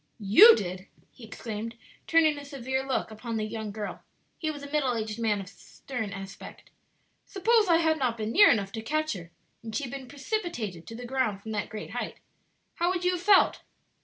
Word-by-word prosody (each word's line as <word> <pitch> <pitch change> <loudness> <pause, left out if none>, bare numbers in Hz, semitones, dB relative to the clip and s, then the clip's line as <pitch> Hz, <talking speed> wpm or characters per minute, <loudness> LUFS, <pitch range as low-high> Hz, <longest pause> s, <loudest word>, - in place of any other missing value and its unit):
"You 280 - +9
did?" 185 0 -5 0.2
he 245 - -13
exclaimed, 220 0 -6 0.3
turning 320 -2 +4
a - - -9
severe 265 -2 -3
look 265 -4 -2
upon 225 +1 -5
the 215 - -1
young 220 0 -5
girl 210 0 -6 0.4
(he 315 - -1
was 290 -2 -6
a 285 - -9
middle 275 -5 +1
aged 220 0 -4
man 215 -3 +1
of 195 - -7
stern 220 +2 -7
aspect). 195 0 -10 0.6
"Suppose 435 +2 +3
I 335 -2 +5
had 320 -1 +2
not 245 -3 0
been 215 0 -3
near 410 - +7
enough 200 -3 +1
to 220 - -5
catch 310 +6 -1
her, 170 -4 -9 0.3
and 225 -2 -7
she 290 - -1
had 245 - -5
been 270 -2 -7
precipitated 270 - -4
to 230 - -8
the 245 +1 -7
ground 240 -6 -1
from 220 - -6
that 210 -1 -2
great 215 -1 -7
height - - -4 0.6
how 345 +1 +2
would 360 -1 -1
you 360 - +4
have 355 -1 -3
felt?" 395 +1 +5
240 Hz, 205 wpm, -28 LUFS, 215-310 Hz, 0.6 s, You